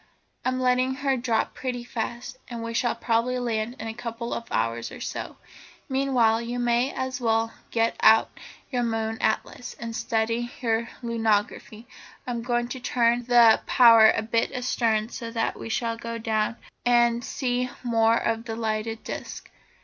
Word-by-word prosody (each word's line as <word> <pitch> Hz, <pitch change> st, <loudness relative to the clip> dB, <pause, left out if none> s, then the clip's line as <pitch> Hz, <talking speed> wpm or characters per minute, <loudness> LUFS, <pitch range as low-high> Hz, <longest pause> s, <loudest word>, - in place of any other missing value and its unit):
I'm 255 Hz, 0 st, 0 dB
letting 255 Hz, +1 st, +2 dB
her 270 Hz, 0 st, 0 dB
drop 235 Hz, -3 st, 0 dB
pretty 250 Hz, -2 st, -4 dB
fast, 240 Hz, +1 st, -5 dB
and 235 Hz, -2 st, -6 dB
we 230 Hz, 0 st, -4 dB
shall 240 Hz, 0 st, +1 dB
probably 235 Hz, +2 st, 0 dB
land 235 Hz, -1 st, -2 dB
in 225 Hz, -, -5 dB
a 220 Hz, -, -4 dB
couple 235 Hz, 0 st, -5 dB
of 230 Hz, -, -4 dB
hours 115 Hz, +1 st, -1 dB
or -, -, -9 dB
so. -, -, -5 dB, 0.5 s
Meanwhile 255 Hz, -5 st, +2 dB
you 240 Hz, +1 st, -4 dB
may 240 Hz, +2 st, +1 dB
as 260 Hz, 0 st, -4 dB
well 225 Hz, -1 st, +1 dB, 0.2 s
get 230 Hz, 0 st, 0 dB
out 220 Hz, 0 st, +5 dB, 0.4 s
your 250 Hz, -2 st, 0 dB
moon 225 Hz, -1 st, -2 dB
atlas, 220 Hz, +2 st, -2 dB
and 230 Hz, -1 st, -5 dB
study 230 Hz, +2 st, -1 dB
your 230 Hz, -1 st, 0 dB
lunography. 225 Hz, -1 st, -1 dB, 0.4 s
I'm 240 Hz, -2 st, -3 dB
going 240 Hz, 0 st, 0 dB
to 260 Hz, -, -5 dB
turn 240 Hz, -1 st, +1 dB
the 235 Hz, -2 st, +6 dB
power 230 Hz, -3 st, +7 dB
a -, -, +1 dB
bit 230 Hz, +1 st, 0 dB
astern 230 Hz, -4 st, 0 dB
so 235 Hz, -2 st, -6 dB
that 225 Hz, -1 st, -1 dB
we -, -, -6 dB
shall 230 Hz, 0 st, -1 dB
go 230 Hz, 0 st, -5 dB
down 220 Hz, -1 st, 0 dB
obliquely, -, -, -22 dB, 0.2 s
and 240 Hz, 0 st, +3 dB
see 250 Hz, 0 st, -1 dB
more 230 Hz, -1 st, +3 dB
of 225 Hz, 0 st, -1 dB
the 225 Hz, -2 st, -4 dB
lighted 225 Hz, 0 st, -3 dB
disc. -, -, -7 dB
235 Hz, 165 wpm, -25 LUFS, 225-245 Hz, 0.5 s, power